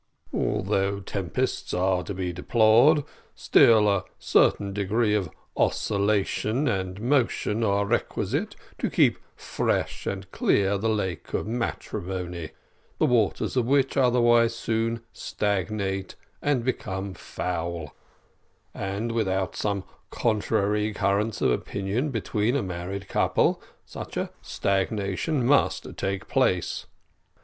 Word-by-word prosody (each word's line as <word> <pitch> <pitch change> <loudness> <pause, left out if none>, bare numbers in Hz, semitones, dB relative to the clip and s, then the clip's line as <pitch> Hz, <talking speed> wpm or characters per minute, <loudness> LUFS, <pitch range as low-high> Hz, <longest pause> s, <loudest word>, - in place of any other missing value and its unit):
Although 100 +1 0
tempests 95 -4 -2
are 90 0 +2
to 100 - -4
be 90 -1 -3
deplored, 115 - +4 0.3
still 110 -2 +5
a 100 -2 +2
certain 100 -1 +2
degree 105 +2 +1
of 100 -6 0 0.3
oscillation 105 +6 +1
and 95 -4 -2
motion 120 -3 +1
are 100 -1 +2
requisite - - -1 0.2
to - - 0
keep - - +3 0.2
fresh - - -2
and 95 -1 -4
clear 100 0 +2
the 110 +3 0
lake 95 -5 -2
of - - -1
matrimony, 95 -7 -4 0.5
the - - +3
waters 115 -2 +1
of 125 -2 +1
which 135 0 +2
otherwise 120 -3 +4
soon 115 0 -1
stagnate 100 -1 -2 0.3
and 135 -5 +1
become 95 -6 -3
foul, 85 -3 -4 0.8
and 100 +4 -3
without 95 -4 -1
some 100 -2 -1 0.3
contrary 105 -1 0
currents 100 +3 0
of - - +4
opinion 100 - -1
between 115 -1 0
a 140 - +1
married 95 +2 -5
couple - - +2 0.2
such - - -8
a - - -2
stagnation 100 - -1
must 140 +3 +2
take 95 0 -3
place. - - 0
100 Hz, 115 wpm, -26 LUFS, 95-115 Hz, 0.8 s, still